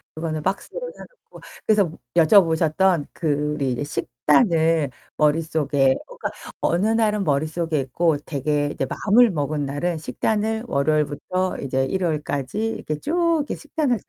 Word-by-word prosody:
그거는 155 -1 -3
박스로 485 - -3
사 - - -9
놓고. - - -17 0.3
그래서 205 -6 +3 0.2
여쭤보셨던 165 -1 +4
그 150 -2 -1
우리 140 -4 -1
이제 120 - -3
식단을 160 - +2 0.3
머릿속에 150 -3 +2
그니까 - - -5 0.3
어느 175 +5 +2
날은 215 -2 +2
머릿속에 155 +1 0
있고 155 +4 +1
되게 145 0 -1
이제 135 - -2
마음을 220 - +4
먹은 145 -2 -2
날은 160 +5 -2
식단을 220 +7 -1
월요일부터 155 +5 0
이제 135 0 0
일요일까지 155 +2 -2
이렇게 155 -8 -4
쭉 335 +1 +1
이렇게 - - -4
식단을 295 -5 -1
160 Hz, 330 characters per minute, -23 LUFS, 145-200 Hz, 0.3 s, 여쭤보셨던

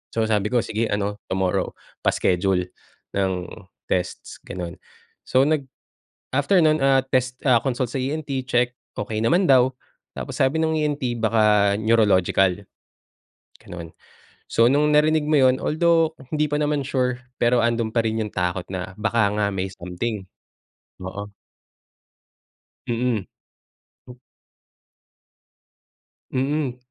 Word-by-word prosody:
So 115 - +2
sabi 105 -2 +1
ko, 120 -1 +2
"Sige 110 +1 -1
ano, 100 0 -2
tomorrow 95 -1 0 0.3
pa-schedule 90 0 +1 0.4
ng 95 -1 +1 0.5
tests," 90 -1 -3
gano'n. 90 -1 -6 0.5
So, 130 +1 +4
nag 155 -2 +1 0.7
after 145 +8 +3
nun, 155 -1 +3
ah, 135 -1 +4
test, 130 -1 -1
ah, 125 -3 +6
consult 130 -2 -1
sa - - -3
ENT, 135 -1 -3
check, 125 0 +1 0.2
okey 110 +1 -2
naman 175 +8 +3
daw. 130 -1 +5 0.4
Tapos - - -6
sabi 140 +5 +2
ng 160 0 +1
ENT 130 -5 -2
baka 105 -2 +3
neurological, 100 -4 +3 1.0
gano'n. 85 -2 -8 0.6
So, 115 - +4
nung 150 +3 +3
narinig 155 0 +3
mo 155 - +3
yun 130 -1 +5
although 165 0 +2 0.2
hindi 150 0 +1
pa 150 - +1
naman 150 -1 0
sure, 125 -2 -1 0.2
pero 120 0 +3
andun 115 -1 0
pa 115 - +3
rin 110 0 -1
yung 105 - -7
takot 90 0 -1
na 95 0 -4
baka 110 -1 +2
nga 100 -1 +2
may 95 0 -2
something. 95 +3 -5 0.8
Oo. 100 +2 -6 1.6
Mm. 115 -4 -1 0.8
M 125 0 -12 2.1
Mm, 135 0 -1
120 Hz, 125 wpm, -23 LUFS, 100-135 Hz, 2.1 s, ah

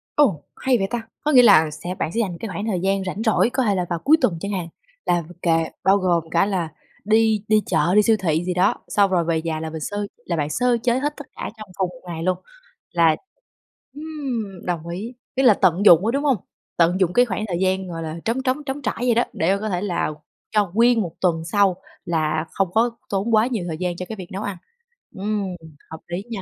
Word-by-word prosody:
Ồ! 200 - +3
Hay 255 -2 +2
vậy 195 - 0
ta, 240 -2 -2 0.2
có 300 - 0
nghĩa 250 -2 +8
là 160 -9 +6
sẽ 175 +4 -6
bạn 160 - -2
sẽ 230 - 0
dành 180 -6 -2
cái 225 - -5
khoảng 205 +3 -4
thời 185 -5 -1
gian 195 0 0
rảnh 190 +4 -4
rỗi 225 +1 +3
có 260 - 0
thể 205 -2 +2
là 180 -1 0
vào 170 - -1
cuối 300 - +5
tuần 170 -4 +1
chẳng 200 +1 -4
hạn, 180 -4 -3 0.4
là 175 -1 +2 0.2
kệ 165 -1 +3 0.2
bao 195 +1 +5
gồm 170 -4 0
cả 195 - +3
là 180 -5 -1 0.4
đi 220 -1 +3
đi 215 -1 +4
chợ 165 +4 +2
đi 210 - +6
siêu 220 +1 +4
thị 165 -1 0
gì 180 -1 -1
đó. 185 +3 +3
Xong 200 -2 +3
rồi 175 -3 +2
về 160 -1 0
nhà 160 -1 -2
là 160 0 -4
mình 160 -1 -6
sơ 205 +5 -3 0.2
là 170 - -2
bạn 145 -1 -1
sơ 245 +3 +2
chế 245 +1 +2
hết 295 +2 -1
tất 290 - -9
cả - - -5
trong 215 -2 -10
cùng 190 -2 0
1 170 - -14
ngày 165 -1 -5
luôn. 185 +1 0 0.5
Là 165 -2 +4 0.8
ừm, 270 - -5
đồng 170 -2 -3
ý, 200 +8 -5 0.2
tức 265 - +2
là 240 -5 +8
tận 185 +1 +2
dụng 175 +1 +8
á, - - +2
đúng 280 +1 0
hông? 270 -6 +3 0.4
Tận 175 +2 +3
dụng 180 -1 +2
cái 245 0 +5
khoảng 215 0 -3
thời 175 -2 -2
gian, 190 0 0
gọi 165 -1 -5
là, 160 +1 -5
trống 245 +4 0
trống 265 +3 0
trống 275 +1 -4
trải - - -2
vậy 245 -2 +2
đó, 240 - +4
để 180 +4 +1
mà - - -4
có 215 - -2
thể 180 -1 -1
là 180 -6 -1 0.4
cho 205 -4 +1
nguyên 235 0 +4
1 175 -4 -3
tuần 170 -3 +2
sau 200 -3 +3 0.3
là 155 -1 0
không 195 -3 0
có 230 +2 +3 0.2
tốn 205 +3 +1
quá 220 +3 +4
nhiều 220 -9 -2
thời 160 -2 -4
gian 180 -1 -2
cho 180 - -5
cái 220 - -4
việc 185 -3 -9
nấu 195 +3 -4
ăn. 200 -3 -4 0.6
Ừm, 205 +1 -2 0.5
hợp 160 - -7
lý 175 +3 -4
nha. 200 -4 -4
195 Hz, 250 wpm, -22 LUFS, 170-225 Hz, 0.8 s, nghĩa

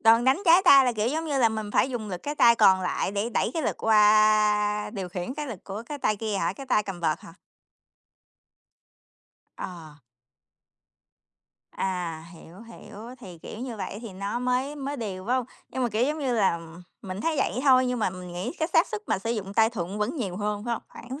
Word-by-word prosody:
Đòn 230 +1 +5
đánh 265 +9 +3
trái 345 +2 +6
tay 275 -5 +8
là, 245 - +1
kiểu, 215 +1 0
giống 315 +5 -2
như 290 -4 -1
là, 230 -3 +5
mình 215 -1 -4
phải 265 - +2
dùng 225 -4 -4
lực 180 -2 -6
cái 290 +1 -3
tay 235 -4 +6
còn 190 -4 +5
lại 185 +1 -1
để 205 +3 -1
đẩy 225 - 0
cái 320 - -1
lực - - -1
qua 210 -1 +4
điều 195 -5 -5
khiển 180 +7 -5
cái 300 0 -4
lực 220 -8 -8
của 200 +3 -6
cái 290 +2 -6
tay 215 - 0
kia 215 -1 -3
hả? - - 0
Cái 275 - -10
tay 215 -5 +2
cầm 190 -3 -7
vợt 160 -2 0
hả? 165 - -13 2.2
Ờ. 160 -4 -8 1.7
À, 175 -4 -3
hiểu, 170 +4 -14
hiểu. 230 0 -11
Thì, 180 -6 -11
kiểu, 215 - -9
như 245 -3 -5
vậy 205 0 -5
thì 225 -5 -8
nó 200 +5 -3
mới 250 +4 -1
mới 280 +1 -4
đều, 195 -4 -5
phải 250 - +1
hông? 250 -2 -2 0.2
Nhưng 260 - -3
mà, 245 - +1
kiểu, 220 +1 -1
giống 305 +3 -1
như 260 -4 -1
là, 190 -6 +2 0.4
mình 190 +1 -6
thấy 325 +3 0
vậy 260 -2 0
thôi, 255 -2 +5
nhưng 250 -1 -1
mà 210 - 0
mình 180 -1 -9
nghĩ 180 +7 -4
cái 320 0 0
xác 330 - +5
suất 430 -1 -5
mà - - 0
sử 225 +4 -3
dụng 200 -4 -3
tay 225 0 +4
thuận 195 -1 -5
vẫn 240 +10 -1
nhiều 195 -8 -3
hơn, 210 0 -3
phải 240 - -2
hông? - - -7
Khoảng 260 +5 -9
220 Hz, 225 wpm, -26 LUFS, 195-255 Hz, 2.2 s, tay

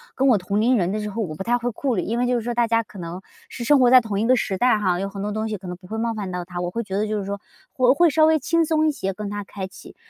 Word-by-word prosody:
跟 270 - +2
我 240 -5 +5
同 195 +3 -2
龄 245 +3 +3
人 180 -2 0
的 215 - -2
时 210 - -4
候 215 +3 -4
我 165 -7 -4
不 190 - -5
太 240 +3 +2
会 245 0 -2
顾 255 +2 -1
虑， 185 - 0
因 230 +6 -2
为 245 - +1
就 250 - +1
是 240 - 0
说 240 +2 -3
大 235 0 +2
家 230 0 +2
可 200 -3 -13
能 170 +2 -6 0.3
是 240 - -7
生 285 +4 +4
活 250 -1 +5
在 255 0 +8
同 210 -3 -3
一 225 - +1
个 255 - +5
时 195 -5 -1
代 245 +1 +3
哈， 185 -4 0
有 195 - -2
很 195 0 -7
多 210 +1 -2
东 215 +1 -2
西 215 - -3
可 185 -1 -11
能 180 - -6
不 180 - -16
会 220 - -5
冒 230 0 -1
犯 200 -4 -5
到 180 0 -3
他， 175 0 -7
我 175 0 -2
会 230 +6 -3
觉 195 -2 -4
得 210 +1 0
就 215 0 -1
是 200 - -5
说 200 +1 -4 0.4
我 255 0 +5
会 345 +2 +4
稍 310 +1 +4
微 315 0 +4
轻 335 +2 +1
松 315 0 +2
一 - - +3
些 195 -9 -3
跟 205 +1 -6
他 205 0 -4
开 195 -1 -6
启。 190 - -14
215 Hz, 385 characters per minute, -23 LUFS, 195-245 Hz, 0.4 s, 在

